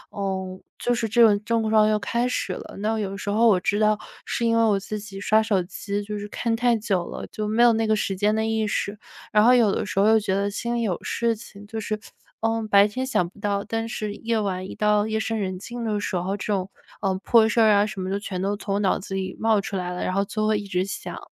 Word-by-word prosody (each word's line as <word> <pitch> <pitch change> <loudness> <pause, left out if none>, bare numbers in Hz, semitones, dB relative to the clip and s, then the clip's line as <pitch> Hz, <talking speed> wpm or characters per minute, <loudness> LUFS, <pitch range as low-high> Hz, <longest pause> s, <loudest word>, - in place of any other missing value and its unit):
嗯， 190 -2 -3 0.2
就 245 - 0
是 225 -2 -1
这 235 +1 +5
种 210 -2 +4
症 225 0 0
状 215 -1 +5
又 215 - +3
开 235 +4 0
始 200 -6 -2
了。 - - -9
那 220 +2 0
有 195 -1 -3
时 200 - -5
候 225 +3 +4
我 195 -5 +5
知 205 +4 0
道 215 0 +3 0.3
是 235 - -1
因 230 0 +3
为 230 - +4
我 205 -3 +3
自 210 +2 -5
己 200 -2 -9
刷 215 +2 +4
手 210 -4 +1
机 200 +3 -4
就 210 0 -5
是 205 - -6
看 230 +1 -1
太 240 +1 +2
久 195 -5 -1
了， - - -6
就 215 -1 -4
没 220 +3 +1
有 235 -1 +6
那 225 0 +1
个 215 - +3
时 195 -2 -1
间 210 +2 +2
的 220 0 0
意 220 -1 0
识。 205 0 -2 0.3
然 210 0 +5
后 245 +2 +7
有 230 -5 +5
的 - - -1
时 195 - -2
候 205 - +5
又 220 0 +6
觉 200 -3 -1
得 200 +1 0
心 235 +3 -3
里 235 - 0
有 195 -6 0
事 230 -1 0
情， 205 -1 -12
就 225 +1 -5
是， 215 0 -3 0.4
呃， 225 0 0
白 200 0 +6
天 255 +5 -3
想 260 -9 +1
不 200 - -20
到， 200 0 -1
但 225 +1 -3
是 215 -2 -4
夜 225 +1 -1
晚 185 -3 -2
一 - - -8
到 210 0 +2
夜 220 0 -1
深 225 0 -2
人 185 -2 -3
静 240 +3 -6
的 210 -2 0
时 195 - -3
候， 185 +3 -1
这 - - -6
种， 190 -1 -2 0.3
呃， 195 -2 +1
破 225 -2 +5
事 225 +1 +1
儿 220 - +6
啊 205 +1 +4
什 190 -2 -5
么 185 - -3
的 195 - -1
就 - - -5
全 190 -3 -5
都 200 +2 0
从 200 -1 -2
脑 190 - +2
子 195 0 -8
里 190 -1 -3
冒 220 -2 +3
出 195 - -5
来 180 -1 -2
了， 180 - -4
然 185 - -1
后 200 +1 +2
就 215 +1 -1
会 215 -1 +2
一 205 - -8
直 180 -1 0
想。 195 - -6
210 Hz, 300 characters per minute, -24 LUFS, 195-225 Hz, 0.4 s, 后